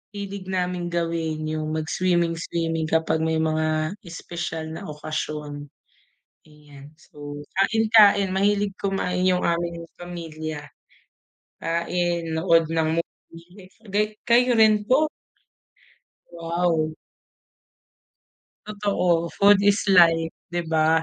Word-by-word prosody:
hilig 200 -1 -6
naming 180 -1 -2
gawin, 165 -2 -2
yung 155 0 -3
mag-swimming-swimming 165 -1 -1
kapag 160 0 +1
may 160 0 0
mga 155 0 0 0.2
espesyal 170 -1 -5
na - - -7
okasyon, 150 -1 -5 0.8
ayan. 145 -1 -15
So, 145 -1 -9 0.2
kain-kain, 215 -3 +5
mahilig 200 0 +1
kumain 185 -2 -1
yung 180 -1 +2
aming 170 0 -1
pamilya, 155 -4 -7 0.9
kain, 170 0 -1
nood 165 -2 +3
ng 160 0 +1
movie 175 +4 -17 0.2
gay 210 +2 0
kayo 245 +1 +4
rin 215 -1 +5
po? 300 +4 +4 1.2
Wow. 170 -1 -1 1.7
Totoo, 195 -5 0
food 200 0 +5
is 205 +1 +3
life 165 -3 +5 0.2
'di 175 0 -3
ba? 160 0 +3
170 Hz, 95 wpm, -24 LUFS, 160-190 Hz, 1.7 s, kain-kain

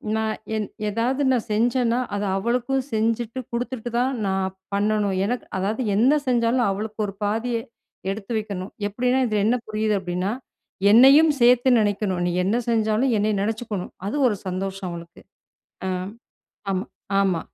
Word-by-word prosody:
நான் 220 0 -1 0.2
என் 215 -2 -2 0.2
எதாவது 240 +6 0
நான் 240 -3 0
செஞ்சன்னா, 240 +2 +2 0.2
அத 205 - -2
அவளுக்கும் 250 +5 0
செஞ்சுட்டு 230 +2 0
குடுத்துட்டு 240 0 -3
தான் 260 +2 +1
நான் 190 0 -1 0.2
பண்ணணும். 205 -1 +1
எனக்கு 245 +4 -2
அதாவது 205 +6 -1
என்ன 260 +8 +4
செஞ்சாலும் 240 -1 +2
அவளுக்கு 210 +2 -4
ஒரு 195 - -6
பாதிய 225 +3 0 0.5
எடுத்து 205 +2 -7
வைக்கணும். 200 -3 -5 0.2
எப்பிடின்னா 250 +5 +1
இதில 210 -2 +1
என்ன 235 +3 +3
புரியுது 215 0 0
அப்பிடின்னா, 180 +2 -2 0.6
என்னையும் 275 +7 +8
சேர்த்து 245 +1 +5
நினைக்கணும். 200 -3 0
நீ - - +1 0.2
என்ன 210 +5 +2
செஞ்சாலும் 225 +2 +2
என்னைய 210 +1 +1
நினைச்சுக்கணும். 215 -2 -3 0.2
அது 210 - -2
ஒரு 210 - +1
சந்தோஷம் 190 0 -3
அவளுக்கு. 170 0 -10 0.7
அ - - 0 0.8
ஆமா, 190 +4 -2 0.3
ஆமா. 185 -4 +1
220 Hz, 140 wpm, -23 LUFS, 200-240 Hz, 0.8 s, என்னையும்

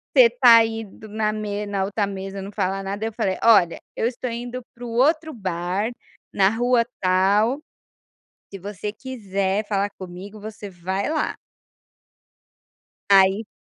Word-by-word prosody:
"você - - +9
está 240 - +7
aí 225 0 +1
do 215 +2 -13
na 215 0 0
me 210 -1 -3
na 200 -1 -1
outra 205 0 -1
mesa, 195 0 -6
não 200 +2 -7
fala 195 -1 -1
nada", 200 +3 -3
aí - - -1
eu - - -15
falei: 195 -5 -1
"Olha, 200 -7 +5 0.2
eu 225 - +1
estou 250 0 -4
indo 240 +1 -5
para 245 +1 -9
o - - -5
outro 310 +7 +2
bar, 190 +1 -2 0.4
na 195 -1 +4
rua 240 +2 +2 0.2
tal. 200 +8 +3 0.9
Se 195 - -7
você 205 +2 -5
quiser 205 -5 -2
falar 200 -1 0
comigo, 190 +3 -9
você 210 -1 -8
vai 190 - -3
lá". 310 -1 -1 1.7
Aí 195 +2 +5
205 Hz, 155 wpm, -23 LUFS, 195-230 Hz, 1.7 s, você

